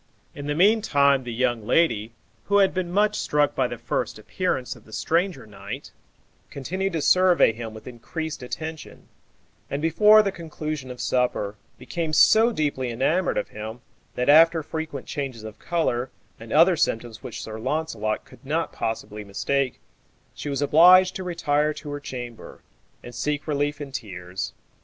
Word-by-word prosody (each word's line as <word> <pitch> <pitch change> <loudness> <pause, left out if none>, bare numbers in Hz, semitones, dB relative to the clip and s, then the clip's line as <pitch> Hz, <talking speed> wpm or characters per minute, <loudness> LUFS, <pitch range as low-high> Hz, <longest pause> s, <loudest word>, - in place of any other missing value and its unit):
In 145 0 -7
the 145 - -1
meantime 145 - +3
the 120 - -4
young 120 -1 0
lady, 115 -10 +2 0.3
who 200 - +2
had 195 -1 +4
been 185 -2 -2
much 210 +2 +2
struck 145 -1 +1
by 130 - +1
the 120 - -6
first 120 0 -3
appearance 130 - -2
of 115 - -18
the 110 - -15
stranger 165 - 0
knight, 105 +6 -8 0.6
continued 185 +7 -3
to 160 -3 -1
survey 185 -9 +5
him 110 -1 -7
with 110 - -11
increased 155 +6 -6
attention, 155 +5 -7 0.6
and, 140 - -2
before 210 +7 +6
the 200 - -1
conclusion 155 -5 -6
of 125 -1 -8
supper, 125 -5 0 0.2
became 165 -2 -4
so 220 +9 +6
deeply 145 - -1
enamoured 155 +10 0
of - - -2
him, 110 +3 -7 0.3
that 125 - -1
after 160 +2 +6
frequent 160 -3 -5
changes 135 -6 -5
of 110 -1 -9
color, 135 -7 -1 0.3
and 115 0 -11
other 170 +4 +6
symptoms 115 -6 -1
which - - -7
Sir 110 0 -7
Launcelot 120 -5 -2
could - - -18
not 155 +3 -2
possibly 105 -1 -4
mistake, 130 +6 -1 0.5
she 145 - -6
was 140 0 -1
obliged 180 +5 +6
to 190 - -4
retire 150 -4 0
to 145 0 -8
her 145 - -4
chamber, 120 -4 -8 0.4
and 120 - -10
seek 150 +3 -2
relief 145 0 -1
in 145 -2 -7
tears. 95 -7 -6
145 Hz, 160 wpm, -24 LUFS, 120-165 Hz, 0.6 s, before